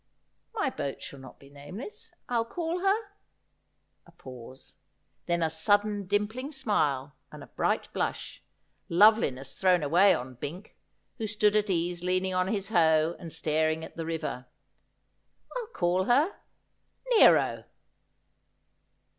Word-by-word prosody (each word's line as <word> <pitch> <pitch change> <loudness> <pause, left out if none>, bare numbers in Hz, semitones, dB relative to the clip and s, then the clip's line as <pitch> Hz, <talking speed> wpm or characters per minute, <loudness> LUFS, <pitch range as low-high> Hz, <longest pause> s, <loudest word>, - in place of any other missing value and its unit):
' - - -48
My 415 -11 0
boat 140 - -4
shall 140 - -9
not 130 -1 -13
be 140 - -17
nameless. 185 - -9 0.2
I'll 235 -2 +1
call 330 +8 -3
her 390 +2 +3 0.6
' - - -48
A - - -17
pause, 130 -5 -12 0.5
then 170 -1 +1
a 160 - +2
sudden 205 +4 +1
dimpling 215 +8 -1
smile 150 - 0 0.2
and - - -10
a - - -16
bright - - 0
blush, - - -3 0.5
loveliness 170 - +4
thrown 180 -3 +2
away 180 +7 +5
on 130 +1 -6
Bink, 160 - -8 0.4
who 220 - -2
stood 210 0 +2
at 210 -1 +2
ease 175 -1 -1
leaning 185 +1 0
on 185 0 +1
his 200 -1 -2
hoe 160 -4 +3
and 165 - -8
staring 155 +1 0
at - - -14
the 165 -1 -5
river. 155 -6 -4 0.6
' - - -23
I'll 485 -3 -4
call 185 - 0
her 285 - +3 0.4
— - - -32
Nero.' 455 - +5
185 Hz, 145 wpm, -28 LUFS, 155-215 Hz, 0.6 s, away